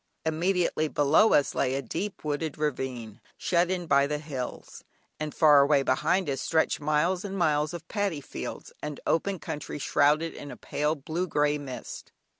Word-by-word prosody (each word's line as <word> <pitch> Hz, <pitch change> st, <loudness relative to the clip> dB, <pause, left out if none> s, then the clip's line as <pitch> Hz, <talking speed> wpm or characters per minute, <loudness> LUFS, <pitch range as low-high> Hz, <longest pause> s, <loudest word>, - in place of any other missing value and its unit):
Immediately 170 Hz, 0 st, +1 dB
below 150 Hz, +9 st, +4 dB
us 145 Hz, -, +3 dB
lay 130 Hz, -, 0 dB
a 135 Hz, -, -1 dB
deep 195 Hz, -, -4 dB
wooded 150 Hz, 0 st, -2 dB
ravine, 130 Hz, -7 st, -3 dB, 0.2 s
shut 175 Hz, 0 st, +1 dB
in 180 Hz, -2 st, -2 dB
by 140 Hz, -3 st, +4 dB
the 150 Hz, +1 st, -1 dB
hills, 140 Hz, -5 st, -7 dB, 0.4 s
and 155 Hz, 0 st, -3 dB
far 150 Hz, -3 st, +6 dB
away 140 Hz, 0 st, +4 dB
behind 160 Hz, +8 st, +1 dB
us 135 Hz, -2 st, -2 dB
stretched 160 Hz, -1 st, +1 dB
miles 155 Hz, +5 st, +1 dB
and 195 Hz, -1 st, -5 dB
miles 150 Hz, -3 st, +2 dB
of 170 Hz, -1 st, -8 dB
paddy 200 Hz, -7 st, -1 dB
fields 140 Hz, -, -7 dB
and 150 Hz, -2 st, -5 dB
open 190 Hz, +4 st, +1 dB
country 150 Hz, -2 st, -6 dB
shrouded 150 Hz, +3 st, +2 dB
in 145 Hz, -, -9 dB
a -, -, -8 dB
pale 150 Hz, +2 st, -1 dB
blue 160 Hz, +5 st, -3 dB
grey 150 Hz, -2 st, +1 dB
mist. 135 Hz, -3 st, -8 dB
150 Hz, 170 wpm, -27 LUFS, 145-170 Hz, 0.4 s, far